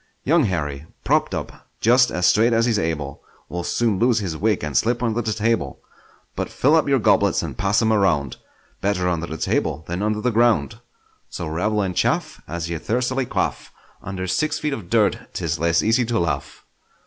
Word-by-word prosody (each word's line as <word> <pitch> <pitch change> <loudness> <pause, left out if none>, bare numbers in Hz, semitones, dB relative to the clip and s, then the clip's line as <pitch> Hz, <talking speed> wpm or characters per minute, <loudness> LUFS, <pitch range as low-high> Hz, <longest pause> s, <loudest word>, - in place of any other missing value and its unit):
Young 155 0 +3
Harry, 75 -6 -3 0.2
propp'd - - +1
up - - -7
just 120 +2 +4
as 90 0 -1
straight 115 +5 +4
as 115 0 +3
he's 115 -3 +1
able, 75 -6 -3 0.3
Will 90 0 -4
soon 110 0 0
lose 120 0 +3
his 95 -7 -2
wig 105 +3 0
and 75 -2 -4
slip 120 - +1
under 115 0 0
the 110 -1 -2
table; 110 - -1 0.6
But - - -3
fill 140 +4 +2
up 155 -3 +2
your 135 - +4
goblets 115 - +2
and - - -5
pass 105 +3 +1
'em 110 0 +3
around— 80 - +1 0.4
Better 95 -2 0
under 85 -1 -1
the 80 - -6
table 80 - -1
than 90 +3 -3
under 105 0 0
the 125 - +1
ground! 115 -1 +2 0.5
So - - -5
revel 105 +7 0
and 90 -2 -3
chaff - - 0
As 85 +2 -4
ye 85 -1 -4
thirstily 125 - -1
quaff: - - -2 0.3
Under 95 -1 -5
six 150 +12 0
feet 150 -2 -2
of 105 -10 -7
dirt 110 -2 +2
'tis - - -2
less 85 0 +2
easy 115 +3 +3
to 115 0 -1
laugh! 75 -7 -3
105 Hz, 195 wpm, -22 LUFS, 85-115 Hz, 0.6 s, just